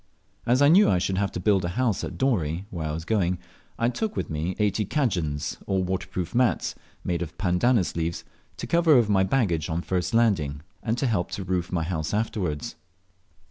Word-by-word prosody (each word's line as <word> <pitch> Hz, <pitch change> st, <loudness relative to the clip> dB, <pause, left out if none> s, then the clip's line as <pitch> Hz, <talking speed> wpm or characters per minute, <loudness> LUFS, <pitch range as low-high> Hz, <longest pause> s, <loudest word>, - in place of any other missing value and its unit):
As 125 Hz, +4 st, +4 dB
I -, -, +7 dB
knew 185 Hz, +7 st, +6 dB
I 90 Hz, -, +3 dB
should 95 Hz, +1 st, 0 dB
have 100 Hz, -2 st, 0 dB
to -, -, -3 dB
build 95 Hz, 0 st, +2 dB
a -, -, 0 dB
house 125 Hz, -6 st, +1 dB
at -, -, -5 dB
Dorey, 95 Hz, -, 0 dB
where 80 Hz, -3 st, -3 dB
I -, -, -2 dB
was 80 Hz, +1 st, -5 dB
going, 90 Hz, -4 st, +1 dB, 0.4 s
I 115 Hz, -, +1 dB
took 215 Hz, -, -2 dB
with -, -, -3 dB
me 80 Hz, +4 st, -2 dB
eighty 105 Hz, 0 st, +1 dB
cadjans, 90 Hz, -, -1 dB
or 95 Hz, -1 st, +1 dB
waterproof 90 Hz, 0 st, -3 dB
mats, 125 Hz, -1 st, +2 dB, 0.3 s
made 85 Hz, -1 st, -1 dB
of 85 Hz, 0 st, -6 dB
pandanus 95 Hz, +3 st, +2 dB
leaves, 85 Hz, 0 st, -2 dB, 0.3 s
to -, -, -5 dB
cover 170 Hz, -2 st, +4 dB
over 115 Hz, -4 st, +4 dB
my 95 Hz, -1 st, +4 dB
baggage 95 Hz, -, +1 dB
on 85 Hz, +2 st, -2 dB
first 90 Hz, +4 st, -1 dB
landing, 80 Hz, -12 st, +2 dB, 0.2 s
and 115 Hz, +1 st, -1 dB
to 130 Hz, -, 0 dB
help 105 Hz, -8 st, 0 dB
to 100 Hz, -, -3 dB
roof 90 Hz, -1 st, -2 dB
my 85 Hz, -3 st, 0 dB
house 80 Hz, +1 st, -2 dB
afterwards. 95 Hz, -9 st, -2 dB
95 Hz, 200 wpm, -26 LUFS, 85-115 Hz, 0.4 s, I